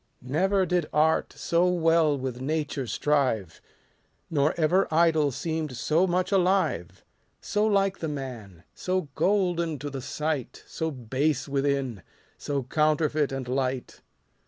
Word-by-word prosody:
Never 185 +9 +1
did 175 -3 0
art 155 +1 +2
so 170 +2 +1
well 165 -4 +3
with 130 -2 -5
nature 145 -2 -2
strive; 125 - 0 0.7
Nor 150 -1 +2
ever 175 +5 +3
idol 160 -2 +3
seem'd 155 -2 -3
so 155 +7 +2
much 180 +2 0
alive: 190 0 +1 0.3
So 210 0 0
like 195 -2 +1
the 160 - -3
man; 120 - -7
so 185 -4 -2
golden 175 -5 +1
to 145 +1 -6
the 135 -1 -5
sight, 145 -1 -3
So 160 - -3
base 135 +2 -1
within, 140 -6 -1 0.4
so 140 -2 -2
counterfeit 150 +1 +1
and 135 -2 -4
light. 130 0 -2
150 Hz, 130 wpm, -26 LUFS, 135-170 Hz, 0.7 s, well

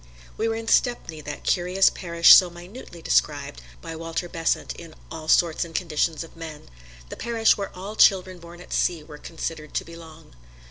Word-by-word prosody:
We 225 - -1
were 225 - -1
in 225 0 -6
Stepney, 230 -12 +1
that 145 0 -8
curious 180 +2 +2
parish 170 -2 +5
so 180 - +7
minutely 175 0 -12
described - - 0 0.2
by 165 - -7
Walter 165 +2 -4
Besant 165 -1 -2
in 165 -2 -12 0.2
"All 160 -1 -8
Sorts 165 +1 +3
and 165 -1 -11
Conditions 165 -2 -1
of 165 - -15
Men" 160 - -10 0.4
the - - -7
parish 230 -1 +2
where 200 -1 -5
all 200 +4 -7
children 185 -3 +3
born 170 +1 -13
at - - -9
sea 170 -3 0
were 150 -1 -12
considered 160 -2 -7
to - - -1
belong. 165 -1 -13
170 Hz, 180 wpm, -24 LUFS, 160-185 Hz, 0.4 s, so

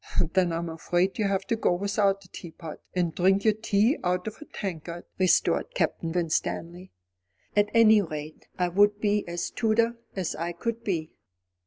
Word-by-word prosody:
"Then 185 -2 +3
I'm 165 +1 -2
afraid 175 +4 -1
you'd 210 - +2
have 195 0 -1
to 230 - 0
go 220 - +1
without 200 +1 0
a 180 - -21
teapot, 165 -2 -9 0.2
and 175 -3 0
drink 190 +4 +2
your 215 - +5
tea 215 +4 +1
out 180 0 0
of 220 0 -5
a - - -8
tankard," 175 - -6
retorted 185 - +2
Captain 165 - -1
Winstanley. 175 +1 -2 0.6
"At 205 0 +3
any 220 -2 +7
rate, 155 -3 -7
I 180 -1 +1
would 205 +3 +3
be 210 -1 +1
as 175 0 -3
Tudor 230 +1 +1 0.2
as 190 -4 -2
I 170 +2 -3
could 230 +6 -4
be." 165 -7 -2
190 Hz, 170 wpm, -27 LUFS, 170-210 Hz, 0.6 s, any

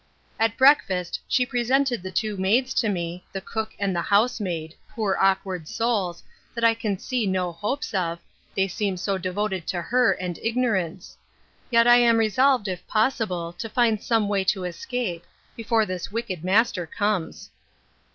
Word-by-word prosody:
At 225 0 +1
breakfast 195 - +3
she 250 - +2
presented 250 -1 +1
the 185 - -6
two 215 +2 -1
maids 225 +8 +1
to 225 - +1
me, 175 -2 -3
the 195 - -4
cook 220 +3 -5
and 200 -2 -1
house 205 +8 +2
maid, 165 -5 -4 0.2
poor 210 -4 -1
awkward 190 -3 +1
souls, 200 -7 -1 0.3
that 235 - -3
I 230 0 +6
can 215 -3 -2
see 240 +1 -2
no 185 -2 0
hopes 210 - -3
of, 170 -3 -1 0.4
they 190 0 +2
seem 195 -1 -2
so 190 +2 -1
devoted 190 0 -2
to 180 - -1
her 250 +3 +3
and 180 -2 -5
ignorance. 205 -7 -1 0.5
Yet 230 -1 +5
I 240 0 +7
am 235 -1 +5
resolved, 225 +1 +3
if 185 -2 -5
possible, 215 -7 0
to 225 +6 -6
find 225 -2 +2
some 225 -3 +1
way 200 -1 +1
to 190 -1 +1
escape, 180 0 -4 0.3
before 225 -1 +1
this 185 -1 -5
wicked 205 -7 -4
master 190 -2 +2
comes. 205 -1 -2
205 Hz, 160 wpm, -24 LUFS, 185-230 Hz, 0.5 s, I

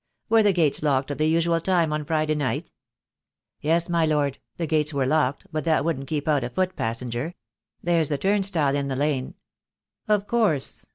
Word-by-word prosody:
"Were 225 0 +5
the 205 -1 +4
gates 165 -6 +2
locked 140 -2 +1
at 145 - -5
the 155 - +2
usual 165 +1 +2
time 170 -4 +1
on 150 -1 -2
Friday 155 0 0
night?" 145 -4 -2 0.9
"Yes, 165 +3 +1
my 170 -2 +1
Lord 145 -3 0
— - - -49
the 170 - -1
gates 155 -1 +1
were 135 -2 +1
locked, 145 +2 +1
but 155 -2 -2
that 155 -3 +2
wouldn't 135 -5 -2
keep 150 -1 -3
out 145 -4 +2
a 120 - -3
foot 185 +8 -1
passenger. 120 +7 -3 0.5
There's 170 -3 +2
the 145 - 0
turnstile 190 -6 +1
in 140 -1 -1
the 135 - -2
lane." 140 -2 -1 0.7
"Of 210 -1 +2
course. 205 - 0
155 Hz, 190 wpm, -24 LUFS, 140-170 Hz, 0.9 s, Were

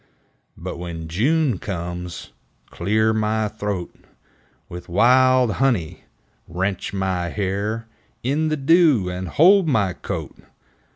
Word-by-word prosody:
But - - -6
when 85 -2 -6
June 125 - +1
comes 90 -2 -6 0.4
Clear 110 +4 +1
my 110 0 0
th'oat 100 -4 -4 0.7
With 90 +1 -9
wild 125 +5 +4
honey! 115 -13 0 0.4
Rench 95 +3 -3
my 95 -3 -2
hair 105 +4 -2 0.4
In 145 +5 0
the 155 0 -1
dew! 140 - +4
And 90 0 -5
hold 180 - +5
my 100 -10 +1
coat! - - -6
105 Hz, 110 wpm, -22 LUFS, 90-130 Hz, 0.7 s, hold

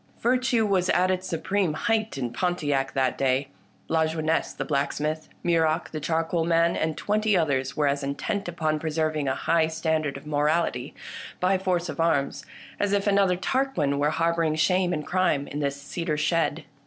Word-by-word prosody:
Virtue 250 -1 +2
was 185 -3 +1
at 185 +1 +3
its 185 0 -2
supreme 185 0 0
height 220 -2 0
in 125 -3 -3
Pontiac 145 -7 0
that 130 -2 0
day. 135 +1 +1 0.4
Lajeunesse 160 0 0
the - - -5
blacksmith, 150 +2 -1 0.2
Muroc 165 -1 +1
the 155 - -4
charcoal 165 +2 0
man, 170 +1 +2
and 155 -1 -1
twenty 210 -1 +1
others 135 -5 0
were 150 - +2
as 140 0 +1
intent 140 +9 -3
upon 155 -3 -1
preserving 155 -2 -1
a 130 - +1
high 165 -1 +2
standard 160 -2 -1
of - - -12
morality, 150 -3 0 0.4
by 185 +2 +3
force 185 -2 0
of 155 -2 -6
arms, 160 -4 +1 0.4
as 205 0 +1
if 200 -1 +1
another 195 -3 +3
Tarquin 190 - 0
were 145 +1 +2
harbouring 165 0 +1
shame 180 +3 +2
and 150 -3 -2
crime 180 -6 +1
in 145 - -5
this 140 -1 -2
cedar 155 +2 -3
shed. 160 0 0
160 Hz, 165 wpm, -26 LUFS, 150-180 Hz, 0.4 s, at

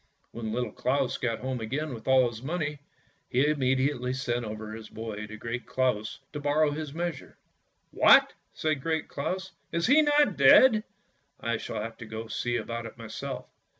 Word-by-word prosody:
When 110 -2 -5
Little 120 -1 -2
Claus 130 +3 0
got 115 -3 -1
home 130 -2 -3
again 135 +6 -3
with 110 -2 -9
all 130 -1 +5
his 115 -1 -7
money, 150 0 -3 0.5
he 130 +3 +3
immediately 130 -3 +1
sent 120 -2 -1
over 110 0 -6
his 110 -1 -9
boy 105 -1 -6
to 110 +1 -9
Great 115 +2 -5
Claus 125 -5 0 0.2
to 150 - -4
borrow 145 +1 +2
his 150 0 -4
measure. 170 +2 -5 0.3
" - - -46
What! - - +6
" - - -45
said 155 -3 -1
Great 160 +1 -1
Claus, 185 +6 -3
" - - -43
is 170 0 0
he 290 +5 +6
not 295 - +3
dead? 215 - +7 0.5
I 115 -1 -1
shall - - -5
have 115 +1 -7
to 115 - -9
go 110 0 -5
and 115 - -10
see 120 -1 -1
about 115 -1 -3
it 115 - -13
myself! 115 -1 -6
130 Hz, 190 wpm, -28 LUFS, 115-150 Hz, 0.5 s, dead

